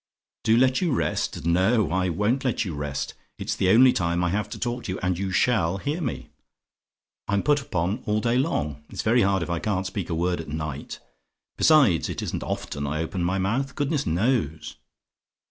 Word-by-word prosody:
"DO 110 +1 +5
LET 130 +4 +3
YOU 175 -4 +1
REST? 125 - -1
"No: 95 +2 +2
I 95 +1 +1
won't 105 +10 0
let 125 -3 0
you 90 - -4
rest. 75 -1 -4 0.2
It's - - -3
the 95 - +1
only 125 +5 +7
time 85 -1 0
I 90 - +1
have 105 +2 -1
to - - -6
talk 120 0 -3
to - - -3
you, - - -5
and 90 0 +1
you 95 +2 -3
SHALL 95 -4 +2
hear 145 - -3
me. 130 - -4 1.0
I'm 100 0 +1
put 145 -1 +3
upon 95 +1 -2
all 105 0 +2
day 120 +2 +1
long: 75 - -1
it's - - -5
very 120 +2 +4
hard 95 -3 +2
if 85 - -6
I 85 - -1
can't 95 -2 -1
speak 95 -1 -4
a 85 - -1
word 85 0 0
at 80 - -10
night: 75 -2 -5 0.6
besides, 135 - +4
it - - -4
isn't - - -3
often 70 0 -4
I 75 +2 -2
open 85 +2 -2
my 90 +2 0
mouth, 115 +9 -1
goodness 145 0 -1
knows. 85 - 0
95 Hz, 200 wpm, -25 LUFS, 85-120 Hz, 1.0 s, only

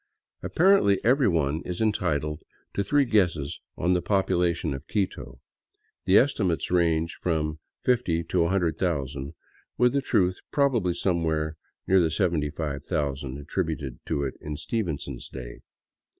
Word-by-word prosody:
Apparently 175 - +4
every 130 +2 +4
one 80 -3 +1
is 90 -1 -5
entitled 80 -9 0 0.3
to 100 - 0
three 140 +8 +3
guesses 85 - +1 0.2
on 90 +2 +2
the 90 - +1
population 90 -4 +1
of 70 +3 -8
Quito. 100 -3 -3 0.7
The 95 +2 +6
estimates 95 - +2
range 85 -2 +1
from 80 -3 -1 0.3
fifty 115 -10 +2
to 85 +1 +1
a - - 0
hundred 85 -4 0
thousand, 70 -4 -2 0.4
with 125 +1 +4
the 140 - +2
truth 90 -8 +1
probably 120 -12 +2
somewhere 80 -4 0 0.3
near 95 0 +4
the 85 -2 +3
seventy 80 -4 0
five 75 -2 -4
thousand 70 -2 -2
attributed 75 -3 -3
to 70 - 0
it 70 - -2
in 75 0 -5
Stevenson's 75 - -4
day. - - -8
85 Hz, 140 wpm, -26 LUFS, 75-95 Hz, 0.7 s, The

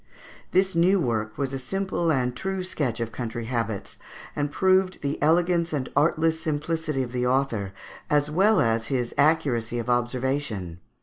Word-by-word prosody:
This 190 +1 +2
new 185 +4 +4
work 110 -7 -1
was 135 -1 -2
a 135 - -2
simple 175 +4 -1
and 125 -3 0
true 190 +4 -3
sketch 135 -10 -2
of 115 -1 -3
country 120 0 -4
habits, 115 -3 -3 0.4
and 145 0 -1
proved 185 0 +2
the 140 0 -2
elegance 170 +2 +2
and 135 -3 -2
artless 160 +2 +2
simplicity 155 -2 -1
of 120 - -6
the 125 0 0
author, 125 -7 0 0.4
as 145 -1 +3
well 195 +5 +4
as 115 0 +1
his 125 -2 -1
accuracy 135 -6 +2
of 120 +1 -1
observation. 120 - -1
140 Hz, 160 wpm, -25 LUFS, 120-165 Hz, 0.4 s, new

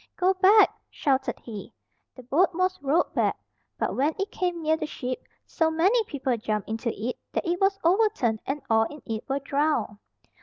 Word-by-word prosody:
"Go 370 +1 +3
back!" 390 +3 +6 0.2
shouted 270 -2 0
he. 215 -4 -9 0.4
The 255 - -11
boat 330 +8 +2
was 370 0 0
rowed 285 +5 +1
back, - - +1 0.4
but - - -1
when 290 +4 +1
it 395 +1 -3
came 355 -3 -2
near 315 +1 +3
the 315 -1 -4
ship, 255 -4 -4 0.2
so 320 -2 +1
many 380 +9 +3
people 270 -6 -1
jumped 215 -2 -2
into 225 +2 -2
it, 235 +4 -4
that - - -1
it 350 +2 -1
was 390 0 +3
overturned 345 - +2
and 280 +2 -3
all 225 0 +4
in 295 +2 -9
it 225 -1 -4
were 270 - +1
drowned. 280 -6 0
300 Hz, 185 wpm, -26 LUFS, 250-365 Hz, 0.4 s, back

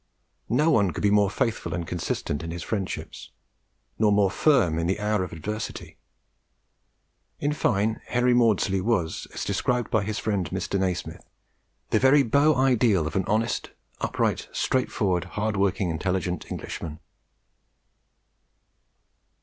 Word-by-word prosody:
No 155 +2 +3
one 100 -7 +3
could 85 - -5
be 100 - +4
more 105 -1 +4
faithful 110 0 -2
and 85 -1 -3
consistent 80 -4 -3
in 85 - -6
his 85 0 -5
friendships, 100 -4 -4 0.7
nor 105 -1 +4
more 100 -2 +3
firm 90 - +3
in 85 - 0
the 95 +3 0
hour 105 -2 0
of 90 - -6
adversity. 105 +7 -6 1.4
In 145 +1 0
fine, 110 -5 0
Henry 125 0 +2
Maudslay 105 -5 +3
was, 90 -6 -1
as - - -3
described 125 -1 -1
by 110 -2 +2
his 105 +1 -3
friend 100 -6 -1
Mr. 95 +1 -2
Nasmyth, 90 -2 -2 0.7
the - - +4
very 135 +2 +5
beau 145 +5 +3
ideal 120 -9 +3
of 80 - -4
an 95 -2 +1
honest, 110 +2 0 0.3
upright, - - -1
straight 130 -1 0
forward, 95 -5 0
hard 105 0 0
working, 95 -2 +1
intelligent 90 +2 -2
Englishman. 75 -1 -6
100 Hz, 140 wpm, -25 LUFS, 90-115 Hz, 1.4 s, very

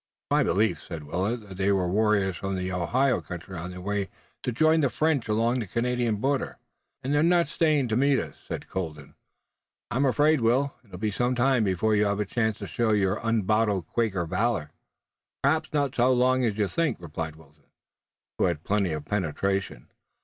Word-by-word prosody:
"It's - - -51
my - - +4
belief," 110 +3 +1
said 80 -3 -7
Willet, 95 +10 -2
"that 95 -2 -10
they 100 +1 +2
were 95 -2 +1
warriors 100 -1 +2
from 95 0 -3
the 90 0 -3
Ohio 120 +9 +1
country 90 +1 -8
on 85 +1 -5
their 90 0 -8
way 100 0 -2 0.3
to - - -2
join 155 +6 +3
the 140 - +2
French 150 -3 0
along 115 +3 +1
the 110 - -4
Canadian 120 +1 0
border." 135 +5 -1 0.5
"And 135 +3 -1
they're 145 - +3
not 170 0 +3
staying 150 -3 +2
to 110 - +1
meet 140 +2 +3
us," - - -3
said - - -5
Colden. 75 -6 -5 0.8
"I'm 130 +3 +2
afraid, 145 +2 +3
Will, 130 +5 +2
it'll 100 -6 -11
be 105 +3 -1
some 125 +4 0
time 125 -1 +3
before 105 +3 +1
you 105 0 +3
have 100 0 0
a 105 - 0
chance 110 +1 0
to - - -6
show 115 -2 +1
your 100 -1 +2
unbottled 110 -4 +1
Quaker 100 -3 -1
valor." 95 -3 -1 0.7
"Perhaps 155 +3 +1
not 145 -3 0
so 125 0 +3
long 130 +1 +3
as 110 -3 -1
you 105 -2 +1
think," 165 - 0
replied 80 -2 -5
Wilton, 75 -2 -21 0.7
who - - +4
had 85 -3 -1
plenty 100 -5 0
of 75 -1 -5
penetration. 95 -6 -2
110 Hz, 195 wpm, -26 LUFS, 95-125 Hz, 0.8 s, my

